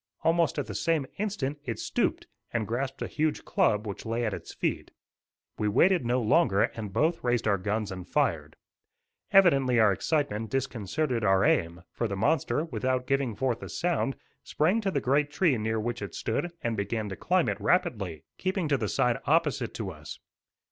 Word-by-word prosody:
Almost 165 0 +2
at - - -1
the - - -7
same 165 -4 0
instant 150 -9 -2
it 115 -6 -4
stooped - - -1 0.3
and 110 -3 -1
grasped 130 +3 -3
a - - -3
huge 155 0 -1
club 105 +1 +2
which 100 -2 -6
lay 115 +1 -1
at 110 - -1
its - - -7
feet. - - -2 0.7
We 105 - +1
waited 170 - +3
no 125 +1 +2
longer, 110 - +3
and 105 -3 -3
both 160 - +1
raised 120 -2 +1
our 100 -2 +2
guns 105 +1 -2
and 90 -1 -7
fired. - - 0 0.8
Evidently 140 - +5
our 105 -3 +5
excitement 115 - -1
disconcerted 130 0 -1
our 95 -1 +4
aim, 85 +1 +1
for 115 - -2
the 100 - -3
monster, 140 +5 +1
without 130 -2 -1
giving 135 -4 0
forth 125 -1 -1
a - - -7
sound, 170 -6 -1 0.3
sprang 180 +9 +1
to 200 - 0
the 145 -7 -1
great 145 +4 +2
tree 150 -1 +2
near 110 +1 -1
which 120 +1 -3
it 100 - -6
stood 145 +10 -2
and 115 -1 0
began 105 +1 -2
to 95 - -5
climb 180 - +1
it - - -2
rapidly, 100 - 0 0.2
keeping 185 -2 -1
to 140 - +3
the 110 -4 -1
side - - +1
opposite - - +1
to - - -4
us. - - -9
125 Hz, 185 wpm, -28 LUFS, 105-155 Hz, 0.8 s, Evidently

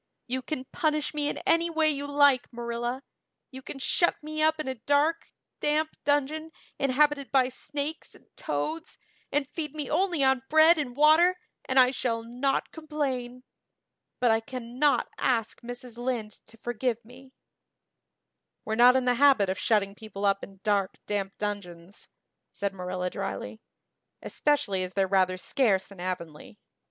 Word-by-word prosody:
"You 260 +1 -2
can 260 -1 -5
punish 305 -2 0
me 295 -1 0
in - - -4
any 335 +1 +3
way 320 -1 +2
you 285 0 -4
like, 285 -3 +3
Marilla. 240 +2 -4 0.5
You 260 0 -9
can 270 - -7
shut 345 +5 +2
me 310 0 -4
up 315 0 +3
in 310 - -4
a 260 - -1
dark, 285 +7 +1 0.3
damp 310 +1 0
dungeon 290 +3 0 0.3
inhabited 280 +1 +2
by 260 -2 +3
snakes 290 +4 -5
and - - -20
toads 325 +2 -4 0.3
and 290 -2 0
feed 300 0 -5
me 295 -4 -4
only 345 -2 +1
on 265 -1 +3
bread 315 +2 +6
and 255 -4 -4
water 320 +5 +5 0.3
and 260 0 +3
I 255 0 +6
shall 230 -3 -2
not 250 +4 -1
complain. 265 -6 -4 0.8
But 245 -2 +4
I 225 - +3
cannot 255 +3 0
ask 230 -4 0
Mrs. 245 0 -8
Lynde 240 -4 -2 0.2
to 225 - -16
forgive 240 0 -2
me." 260 +2 -16 1.3
"We're 220 - -2
not 245 +3 +6
in 260 -1 +2
the 250 - +3
habit 265 -9 +5
of 190 - -4
shutting 200 -3 +1
people 205 -1 -6
up 195 0 +2
in 195 -1 -11
dark 200 -2 0
damp 195 -2 -3
dungeons," 195 -3 -6 0.4
said 200 -1 -3
Marilla 180 -1 -3
drily, 220 - -5 0.6
"especially 255 -11 0
as 185 0 -4
they're 195 -1 +3
rather 185 -1 +2
scarce 195 -2 +1
in 195 - -13
Avonlea. 170 - -6
255 Hz, 155 wpm, -27 LUFS, 215-295 Hz, 1.3 s, bread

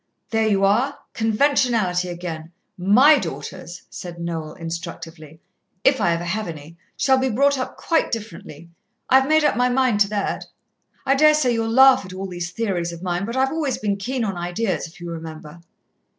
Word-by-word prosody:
"There 225 -1 +2
you 195 -2 +2
are! 240 +8 +1 0.2
Conventionality 225 -6 +1
again. 170 -2 -6 0.2
My 250 +11 +5
daughters," 175 - -7
said 175 -1 -8
Noel 165 -2 -4
instructively, 165 -2 -8 0.4
"if 270 -1 +3
I 170 - +3
ever 170 +1 -3
have 210 +5 -3
any, 160 0 -9 0.2
shall 265 -1 +3
be 260 0 0
brought 280 +4 +2
up 255 - -5
quite 330 -1 0
differently. 170 -7 -7 0.4
I've 265 +1 +5
made 310 0 +4
up 295 - +2
my 250 +1 +2
mind 250 -4 +2
to 200 -1 +4
that. 205 -2 -2 0.6
I 270 - +3
daresay 300 -3 +4
you'll 225 -1 -1
laugh 260 +1 +6
at 185 -1 -10
all 190 +1 -5
these 175 -2 -5
theories 180 -4 -2
of 170 +1 -9
mine, 180 +1 -2
but 235 +3 -4
I've 265 +1 +2
always 305 -4 -1
been 205 -2 -1
keen 250 +5 -3
on 195 -4 -2
ideas, 175 +2 -2
if 165 - -17
you 175 - -7
remember." 160 0 -9
200 Hz, 180 wpm, -22 LUFS, 170-255 Hz, 0.6 s, laugh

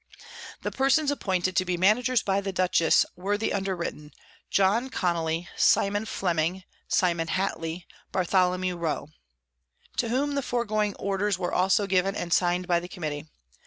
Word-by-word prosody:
_ - - -39
The - - -2
Persons 275 +2 +2
appointed 185 -8 -1
to - - +3
be 180 -1 -2
Managers 225 +6 +3
by 195 0 +1
the 195 0 -3
Dutchess, 180 -3 +3
were 200 +3 -1
the 220 - -1
underwritten, 180 -6 -3 0.4
John 205 +7 +2
Connely, 170 -5 -1
Simon 205 +2 +3
Fleming, 175 -1 -1 0.2
Simon 170 -3 +1
Hatley, 175 -1 -2 0.3
Barth. 185 -1 -2
Rowe. 180 -4 +1 0.9
_To 235 - +1
whom 280 +4 0
the 280 - 0
foregoing 215 -5 -1
Orders 200 0 -1
were 180 -1 -3
also 190 +3 +3
given, 195 0 +1
and 170 -3 -2
sign'd 180 0 +1
by 175 -2 +3
the 175 - -8
Committee. 155 -4 -5
185 Hz, 150 wpm, -26 LUFS, 175-205 Hz, 0.9 s, to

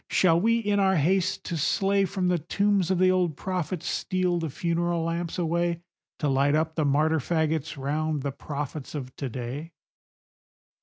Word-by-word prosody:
Shall 170 -2 +4
we, 230 +3 +3
in 205 -3 +1
our 190 -1 +3
haste 180 +4 +1
to 170 - -3
slay, 195 +6 +2
From 190 -1 -1
the 180 -1 +2
tombs 195 +3 +1
of 190 - +2
the 185 +1 +4
old 180 -5 +1
prophets 180 -2 -3
steal 180 -2 0
the 165 -2 -2
funeral 170 +2 -1
lamps 165 0 -2
away 170 0 0 0.3
To 150 - -1
light 140 +1 +3
up 160 +1 0
the 160 -2 0
martyr 155 +3 +2
fagots 160 0 -1
round 150 +1 -1
the 140 - -1
prophets 145 +1 -6
of 130 -3 -6
to 135 - -3
day? 130 +8 -6
165 Hz, 170 wpm, -26 LUFS, 150-185 Hz, 0.3 s, Shall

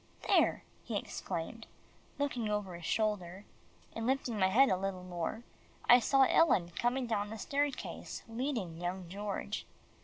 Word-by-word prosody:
"There," - - +4 0.2
he - - -2
exclaimed, - - -5 0.5
looking 250 -6 -1
over 210 -3 -2
his 170 -1 -8
shoulder, 205 -3 -1 0.5
and 225 +1 -3
lifting 255 -4 0
my 190 - +5
head 260 +8 +5
a - - +3
little 185 -1 -3
more, 180 +5 -4 0.4
I 245 +1 +9
saw 270 +3 +4
Ellen 190 - +4
coming 245 +8 0
down 205 -3 -1
the 220 - -6
staircase, 280 +4 -2
leading 225 - -3
young 180 0 -3
George. 200 +2 -4
210 Hz, 145 wpm, -33 LUFS, 185-245 Hz, 0.5 s, I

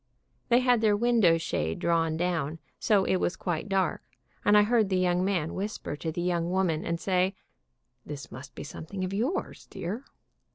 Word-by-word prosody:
They 240 +1 +5
had 245 -2 +3
their 210 -2 +4
window 225 -7 +4
shade 80 - -2
drawn 165 -1 +1
down, 165 -3 -1 0.2
so 205 -4 +3
it 190 - +2
was 180 - 0
quite 175 +2 -3
dark, 195 -1 +1 0.4
and 205 0 +6
I 210 - +7
heard 220 -2 +2
the 190 - +1
young 180 0 +2
man 180 -5 0
whisper 200 -5 -4
to 160 +1 -3
the 175 +2 -3
young 175 -1 0
woman, 180 -4 +1
and 170 0 -2
say, 185 +1 +1 0.7
"This 145 -1 -8
must 130 +4 -10
be - - -6
something 175 +5 -6
of 185 +1 -3
yours, 245 - -2
dear." 205 +9 -5
185 Hz, 180 wpm, -28 LUFS, 165-205 Hz, 0.7 s, I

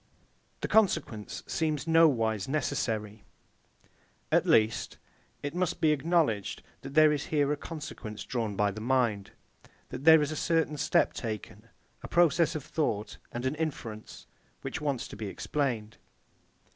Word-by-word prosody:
The - - -1
consequence 145 - +1
seems 155 -3 -1
nowise 125 - +3
necessary. 110 -7 -2 1.1
At - - +3
least, 110 0 +2 0.5
it 145 +1 -3
must 180 -1 -1
be 155 - +4
acknowledged 150 - 0 0.2
that 135 +1 -9
there 155 -1 +7
is 145 - -3
here 145 -2 +2
a - - -1
consequence 145 -9 -7
drawn 115 -5 -3
by 105 0 +2
the 110 +2 -8
mind; 115 -5 +1 0.6
that - - -7
there 160 -1 +8
is 150 - -2
a - - -3
certain 160 -1 0
step - - +2
taken; 110 -3 -6 0.3
a - - -7
process 170 -1 +3
of 155 - -3
thought, 110 -11 -2
and 120 +2 -4
an 130 - +1
inference, 135 -9 -5 0.4
which - - -4
wants 140 -5 -2
to - - -10
be 110 - -5
explained. 115 -1 -2
140 Hz, 145 wpm, -29 LUFS, 110-155 Hz, 1.1 s, there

